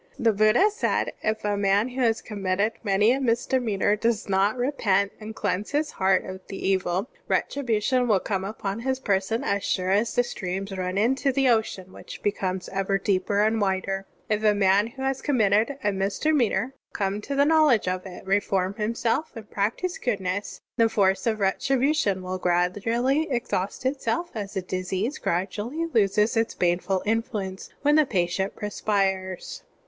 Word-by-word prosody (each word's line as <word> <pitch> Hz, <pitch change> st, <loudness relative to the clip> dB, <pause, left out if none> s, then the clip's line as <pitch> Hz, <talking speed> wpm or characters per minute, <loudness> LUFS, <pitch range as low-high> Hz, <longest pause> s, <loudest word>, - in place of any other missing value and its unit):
(5) -, -, -7 dB
The 225 Hz, -, +6 dB
Buddha 215 Hz, -, +4 dB
said: 430 Hz, -, -1 dB
"If 215 Hz, 0 st, -1 dB
a 205 Hz, 0 st, +1 dB
man 200 Hz, +3 st, +2 dB
who 255 Hz, +1 st, -4 dB
has 230 Hz, -2 st, +1 dB
conmiitted 200 Hz, 0 st, -1 dB
many 205 Hz, +2 st, +3 dB
a 270 Hz, +2 st, 0 dB
misdemeanor 230 Hz, -4 st, +1 dB
does 225 Hz, 0 st, -1 dB
not 195 Hz, +4 st, +2 dB
repent 205 Hz, -7 st, +1 dB
and 220 Hz, 0 st, -8 dB
cleanse 200 Hz, -1 st, -2 dB
his 300 Hz, +1 st, 0 dB
heart 190 Hz, -1 st, +2 dB
of 190 Hz, 0 st, -7 dB
the 195 Hz, -, -6 dB
evil, 190 Hz, +1 st, 0 dB, 0.2 s
retribution 250 Hz, -1 st, +1 dB
will 210 Hz, -4 st, +4 dB
come 190 Hz, -1 st, -2 dB
upon 200 Hz, 0 st, -4 dB
his 260 Hz, +2 st, -1 dB
person 205 Hz, 0 st, 0 dB
as 200 Hz, 0 st, 0 dB
siire 185 Hz, 0 st, +1 dB
as 220 Hz, +3 st, 0 dB
the 245 Hz, -, +4 dB
streams 195 Hz, -3 st, -4 dB
run 185 Hz, 0 st, -3 dB
into 265 Hz, +6 st, +2 dB
the 270 Hz, 0 st, +2 dB
ocean 210 Hz, -5 st, 0 dB
which -, -, -10 dB
becomes 190 Hz, -3 st, -1 dB
ever 195 Hz, 0 st, 0 dB
deeper 195 Hz, +1 st, +1 dB
and 220 Hz, +1 st, +2 dB
wider. 195 Hz, 0 st, -1 dB
" -, -, -37 dB
If 215 Hz, 0 st, 0 dB
a 210 Hz, -1 st, +4 dB
man 200 Hz, +1 st, +3 dB
who 265 Hz, +3 st, -8 dB
has 270 Hz, 0 st, -1 dB
conmiitted 225 Hz, -1 st, +2 dB
a 205 Hz, -, +2 dB
misdemeanor 235 Hz, +6 st, 0 dB, 0.2 s
come 200 Hz, 0 st, -1 dB
to 280 Hz, +6 st, -4 dB
the 280 Hz, +1 st, +4 dB
knowledge 305 Hz, -10 st, +4 dB
of 185 Hz, +1 st, -2 dB
it, 180 Hz, 0 st, -10 dB
reform 195 Hz, -1 st, +1 dB
himself, 230 Hz, +7 st, -1 dB
and 220 Hz, -2 st, -10 dB
practise 230 Hz, -, -1 dB
goodness, 200 Hz, -4 st, -2 dB, 0.2 s
the 230 Hz, -1 st, +4 dB
force 200 Hz, -1 st, +1 dB
of 220 Hz, -1 st, 0 dB
retribution 250 Hz, 0 st, +1 dB
will 185 Hz, 0 st, -4 dB
gradually 225 Hz, -, +1 dB
exhaust 235 Hz, -4 st, -2 dB
itself 265 Hz, +4 st, -1 dB
as 205 Hz, -3 st, -5 dB
a 190 Hz, -, -1 dB
disease 185 Hz, +8 st, -3 dB
gradu 185 Hz, +4 st, -1 dB
ally 280 Hz, +10 st, -2 dB
loses 210 Hz, +1 st, +3 dB
its 225 Hz, 0 st, 0 dB
baneful 180 Hz, +2 st, 0 dB
influence 210 Hz, -3 st, -2 dB
when 295 Hz, +1 st, +4 dB
the 305 Hz, -3 st, +4 dB
patient 190 Hz, -2 st, -1 dB
perspires." 195 Hz, -3 st, -2 dB
210 Hz, 170 wpm, -25 LUFS, 190-235 Hz, 0.2 s, The